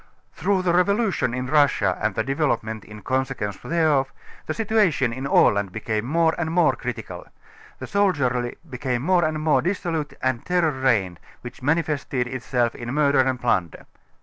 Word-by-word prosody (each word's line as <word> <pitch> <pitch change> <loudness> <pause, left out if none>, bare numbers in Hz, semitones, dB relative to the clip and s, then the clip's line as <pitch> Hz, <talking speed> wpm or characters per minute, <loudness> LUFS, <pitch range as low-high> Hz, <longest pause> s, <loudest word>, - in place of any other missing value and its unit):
Through 195 -2 0
the 175 -2 +2
revolution 195 - +1
in 125 0 -3
Russia 135 -10 +2
and 105 -2 0
the 110 - 0
developement 125 -6 -1
in 105 -1 -12
consequence 130 -6 -2
thereof, 155 -5 +1 0.4
the - - -1
situation 200 - +1
in 130 +3 -4
Aland 100 -7 +3
became 110 +1 -3
more 160 +4 +2
and 165 -2 -1
more 170 -2 +3
critical. 125 -3 -6 0.5
The - - -7
soldiery 140 -12 0
became 125 -2 -3
more 180 +2 +3
and 155 0 -1
more 155 0 +2
dis 185 +3 -1
solute 160 -5 -3
and 130 -2 +1
a - - -24
terror 175 -3 +1
reigned, 110 - 0 0.2
which 120 - -10
manifested 145 -3 0
itself 125 -1 -1
in 120 0 -6
mur 145 0 +2
der 140 -2 +4
and 130 -1 -1
plunder. 95 -9 -1
135 Hz, 170 wpm, -23 LUFS, 120-165 Hz, 0.5 s, der